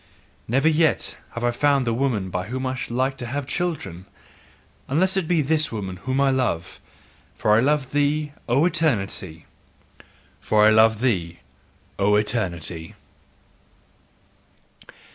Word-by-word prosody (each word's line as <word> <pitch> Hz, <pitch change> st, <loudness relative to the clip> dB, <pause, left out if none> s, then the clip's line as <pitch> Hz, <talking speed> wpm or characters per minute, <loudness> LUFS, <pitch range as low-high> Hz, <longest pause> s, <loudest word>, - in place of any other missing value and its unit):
Never 135 Hz, +6 st, +2 dB
yet 160 Hz, 0 st, +2 dB, 0.2 s
have 120 Hz, -, -5 dB
I 120 Hz, -, +2 dB
found 140 Hz, +1 st, +2 dB
the 115 Hz, -, 0 dB
woman 115 Hz, -7 st, -1 dB
by 90 Hz, 0 st, -3 dB
whom 130 Hz, +3 st, -4 dB
I 130 Hz, -, -1 dB
should 130 Hz, -, -5 dB
like 130 Hz, +2 st, 0 dB
to 120 Hz, -, -6 dB
have 140 Hz, +3 st, -3 dB
children, 135 Hz, -, -3 dB, 0.8 s
unless 185 Hz, +8 st, +2 dB
it 190 Hz, -4 st, 0 dB
be 165 Hz, -3 st, +2 dB
this 155 Hz, +2 st, +1 dB
woman 95 Hz, -4 st, -5 dB
whom 130 Hz, +7 st, -2 dB
I 140 Hz, -1 st, +3 dB
love: 120 Hz, -10 st, -2 dB, 0.6 s
for 105 Hz, -, 0 dB
I -, -, +5 dB
love 140 Hz, +1 st, +1 dB
thee, 145 Hz, +1 st, 0 dB, 0.2 s
O 135 Hz, +7 st, +3 dB
Eternity! 100 Hz, -, -1 dB, 0.9 s
FOR 105 Hz, +11 st, +3 dB
I 110 Hz, -, +6 dB
LOVE 110 Hz, 0 st, +4 dB
THEE, 85 Hz, -, -1 dB, 0.6 s
O 100 Hz, +1 st, +3 dB
ETERNITY! 90 Hz, -7 st, -2 dB
125 Hz, 140 wpm, -23 LUFS, 105-145 Hz, 0.9 s, I